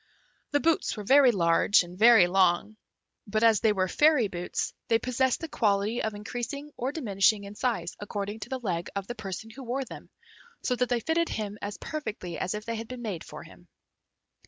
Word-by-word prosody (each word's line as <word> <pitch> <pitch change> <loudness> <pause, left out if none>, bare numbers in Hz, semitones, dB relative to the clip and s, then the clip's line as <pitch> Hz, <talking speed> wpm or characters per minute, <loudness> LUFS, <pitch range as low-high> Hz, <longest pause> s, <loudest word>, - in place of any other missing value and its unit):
The 290 - +2
boots 320 -5 +1
were 210 - -5
very 265 +3 +6
large 175 0 +3
and 175 0 -11
very 225 -1 +7
long; 185 +3 +2 0.5
but 215 +2 0
as 225 -3 +5
they 220 - +3
were 190 -2 0
fairy 295 - +4
boots, 175 -2 -3
they 225 - +4
possessed 255 +3 0
the 325 - -4
quality 210 -3 0
of 220 -1 -2
increasing 245 +7 -5
or 255 +3 -2
diminishing 210 -7 +2
in 200 0 -8
size 210 -7 -2
according 205 +1 -5
to - - -8
the 260 -1 -3
leg 175 -6 -2
of 200 -1 -3
the 240 - -5
person 215 0 -7
who 270 - -11
wore 260 +2 -2
them, - - -11 0.5
so 250 - +1
that 250 0 0
they 240 -2 +1
fitted 330 +3 0
him 210 -1 -4
as 205 0 -5
perfectly 220 - -5
as 185 +3 -2
if 210 0 -6
they 230 -1 -3
had 225 0 -6
been 250 0 -8
made 195 -7 -4
for - - -10
him. - - -16
220 Hz, 205 wpm, -28 LUFS, 200-250 Hz, 0.5 s, very